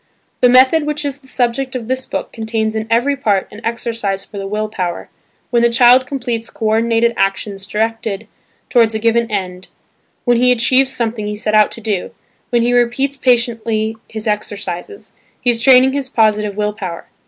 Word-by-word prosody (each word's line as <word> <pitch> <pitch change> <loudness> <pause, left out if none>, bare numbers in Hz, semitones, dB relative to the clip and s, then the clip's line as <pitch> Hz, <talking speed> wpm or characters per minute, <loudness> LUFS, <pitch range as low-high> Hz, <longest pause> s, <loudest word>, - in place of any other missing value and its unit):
The 250 - +5
method 260 +5 +5
which 300 0 -2
is 285 0 -3
the 265 - -19
subject 255 +1 -1
of 245 -3 -4
this 260 +1 -2
book - - -4
contains 220 -1 -2
in 220 0 -3
every 240 +5 +2
part 210 -8 0
an 210 +2 -12
exercise 230 -4 -3
for 200 - -9
the 195 - -5
will 215 +2 -2
power, 180 -5 -4 0.4
when 240 -1 +3
the 235 - +4
child 245 +2 +5
completes 240 -4 -3
co 225 - -6
ordinated 230 +1 +2
actions 195 0 -2
directed 220 -1 -2 0.4
towards 230 -3 +3
a - - +2
given 230 +1 +1
end, 185 -3 -4 0.6
when 245 -1 +3
he 250 +1 +4
achieves 255 +2 +3
something 230 -4 -3
he 210 - -3
set 215 0 -2
out 215 -1 +5
to 230 - -10
do, 205 -4 -2 0.4
when 240 -2 +2
he 245 +1 +1
repeats 245 +3 +1
patiently 230 -4 0
his 220 -1 -6
exercises, 205 - -4 0.3
he 245 - +2
is 230 -1 -3
training 260 +1 +6
his 275 -2 -2
positive 210 -2 +1
will 210 0 0
power. 185 -6 -6
230 Hz, 185 wpm, -17 LUFS, 210-250 Hz, 0.6 s, training